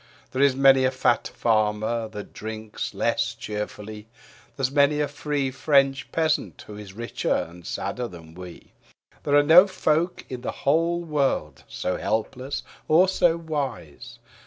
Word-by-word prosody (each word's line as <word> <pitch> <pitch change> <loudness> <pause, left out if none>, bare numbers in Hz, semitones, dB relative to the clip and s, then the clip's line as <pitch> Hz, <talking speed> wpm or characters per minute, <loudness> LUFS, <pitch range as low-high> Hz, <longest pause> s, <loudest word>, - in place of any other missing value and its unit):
There 130 - -1
is 140 -2 +4
many 135 -1 +5
a 130 - +4
fat 125 -3 +1
farmer 110 0 +1
that 105 -1 -9
drinks 110 0 -6
less - - 0
cheerfully, 105 0 -6 0.5
There 135 - -4
is 130 - +1
many 145 +1 +3
a 150 - +1
free 145 -1 -2
French 135 -1 +2
peasant 160 -1 -1
who 105 - -10
is 105 -2 -10
richer 115 +3 -4
and 85 +1 -5
sadder 125 -1 -3
than 85 -4 -13
we. 90 0 -11 0.5
There 145 - +1
are 145 - +6
no 170 +6 +8
folk 170 -2 0
in 125 -2 -6
the - - -3
whole 165 +4 +2
world 140 - -1
so 90 - -3
helpless 130 +5 -3 0.2
or 175 +4 +5
so 175 -3 +2
wise. 135 - -5
130 Hz, 155 wpm, -24 LUFS, 110-150 Hz, 0.5 s, no